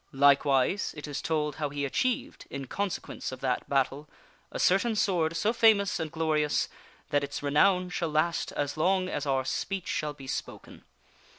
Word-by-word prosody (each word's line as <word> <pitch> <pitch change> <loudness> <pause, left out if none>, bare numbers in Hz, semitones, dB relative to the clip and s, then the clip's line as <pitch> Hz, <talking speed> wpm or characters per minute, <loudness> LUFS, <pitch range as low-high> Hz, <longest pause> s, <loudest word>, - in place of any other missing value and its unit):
Likewise, 140 +6 +3
it 150 - -6
is 145 -1 -4
told 150 -3 -1
how 150 -2 -1
he 145 0 -2
achieved, 245 - -2
in 140 -1 -5
consequence 200 +2 -4
of 130 - -7
that 130 -2 -1
battle, 140 +2 0 0.4
a - - -5
certain 205 +5 +3
Sword 170 -5 +1
so 210 +7 +1
famous 210 -3 +4
and 160 -2 -3
glorious 155 -2 +1 0.4
that 145 -1 +2
its 140 0 -5
renown 180 +6 +3
shall 170 -2 -1
last 155 +2 0
as 145 +1 -2
long 185 +3 +2
as 145 -5 -3
our 135 -1 +1
speech 195 +6 -3
shall 150 -1 -2
be 135 -2 -12
spoken. 130 - -6
150 Hz, 170 wpm, -28 LUFS, 140-185 Hz, 0.4 s, famous